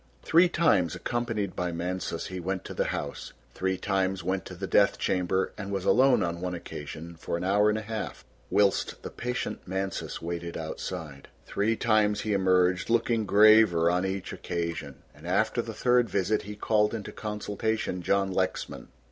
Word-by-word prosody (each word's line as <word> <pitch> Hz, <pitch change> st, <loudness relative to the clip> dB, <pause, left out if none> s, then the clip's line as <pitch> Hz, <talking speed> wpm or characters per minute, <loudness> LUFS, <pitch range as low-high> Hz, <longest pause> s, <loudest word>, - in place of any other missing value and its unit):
Three 175 Hz, +2 st, +5 dB
times, 105 Hz, -, +2 dB
accompanied 115 Hz, -5 st, -2 dB
by 90 Hz, -1 st, -1 dB
Mansus, 85 Hz, 0 st, -3 dB
he 95 Hz, -1 st, -5 dB
went 95 Hz, +1 st, -3 dB
to -, -, -6 dB
the -, -, 0 dB
house, -, -, -4 dB, 0.2 s
three 95 Hz, 0 st, -1 dB
times 95 Hz, -1 st, -1 dB
went 95 Hz, +1 st, -1 dB
to 90 Hz, -, -8 dB
the 95 Hz, +2 st, -4 dB
death 100 Hz, +1 st, +3 dB
chamber 95 Hz, +1 st, 0 dB
and 100 Hz, -1 st, -5 dB
was 95 Hz, -2 st, -2 dB
alone 130 Hz, 0 st, +5 dB
on 85 Hz, 0 st, -3 dB
one 90 Hz, -1 st, -2 dB
occasion 85 Hz, 0 st, -8 dB
for 85 Hz, -, -3 dB
an -, -, -5 dB
hour 100 Hz, +3 st, +3 dB
and 105 Hz, -, +1 dB
a 110 Hz, -, -4 dB
half 110 Hz, 0 st, -5 dB, 0.2 s
whilst 100 Hz, -1 st, +1 dB
the -, -, -6 dB
patient 125 Hz, +1 st, -3 dB
Mansus 95 Hz, +1 st, -3 dB
waited 85 Hz, 0 st, -5 dB
outside. 80 Hz, -2 st, -6 dB, 0.2 s
Three 110 Hz, +3 st, 0 dB
times 110 Hz, -2 st, +2 dB
he 110 Hz, -, -1 dB
emerged 90 Hz, -1 st, +2 dB
looking 115 Hz, -2 st, +1 dB
graver 105 Hz, -5 st, +6 dB
on 90 Hz, +1 st, +1 dB
each 95 Hz, 0 st, -3 dB
occasion, 85 Hz, -1 st, -4 dB, 0.2 s
and -, -, -12 dB
after -, -, +1 dB
the -, -, -6 dB
third 125 Hz, -1 st, +2 dB
visit 100 Hz, +2 st, +1 dB
he 105 Hz, +1 st, -8 dB
called 105 Hz, +1 st, +1 dB
into 105 Hz, -3 st, -6 dB
consultation 105 Hz, -2 st, -3 dB
John 95 Hz, +2 st, +1 dB
Lexman. 95 Hz, 0 st, -2 dB
95 Hz, 175 wpm, -28 LUFS, 90-105 Hz, 0.2 s, graver